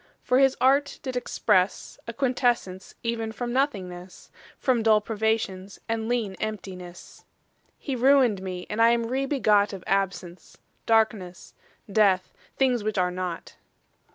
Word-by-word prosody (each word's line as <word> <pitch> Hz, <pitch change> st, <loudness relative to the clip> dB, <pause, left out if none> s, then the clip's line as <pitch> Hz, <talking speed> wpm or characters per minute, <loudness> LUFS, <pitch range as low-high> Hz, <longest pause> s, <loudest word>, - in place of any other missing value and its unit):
For 250 Hz, +1 st, +2 dB
his 270 Hz, -1 st, +4 dB
art 275 Hz, +3 st, +2 dB
did 260 Hz, -2 st, -4 dB
expresse 205 Hz, -6 st, 0 dB
A 230 Hz, -, -5 dB
quintessence 245 Hz, -7 st, -1 dB
even 230 Hz, -1 st, -2 dB
from 240 Hz, +1 st, -4 dB
nothingnesse, 185 Hz, -9 st, -3 dB, 0.3 s
From 255 Hz, -4 st, +1 dB
dull 220 Hz, -1 st, +4 dB
privations, 210 Hz, -3 st, -2 dB
and 225 Hz, 0 st, -2 dB
leane 225 Hz, -6 st, -1 dB
emptinesse: 185 Hz, -4 st, -7 dB, 0.5 s
He 275 Hz, -, -4 dB
ruin'd 250 Hz, -5 st, +4 dB
mee, 185 Hz, -1 st, -6 dB
and 215 Hz, +2 st, -2 dB
I 230 Hz, -, +7 dB
am 235 Hz, 0 st, +1 dB
re 265 Hz, +3 st, -1 dB
begot 210 Hz, -8 st, +2 dB
Of 190 Hz, -2 st, -8 dB
absence, 185 Hz, -2 st, -3 dB, 0.3 s
darknesse, 215 Hz, -5 st, 0 dB, 0.3 s
death; 195 Hz, -3 st, +2 dB, 0.2 s
things 250 Hz, -4 st, +2 dB
which 215 Hz, -1 st, -2 dB
are 180 Hz, -1 st, +1 dB
not. 180 Hz, -2 st, -6 dB
220 Hz, 135 wpm, -25 LUFS, 190-245 Hz, 0.5 s, I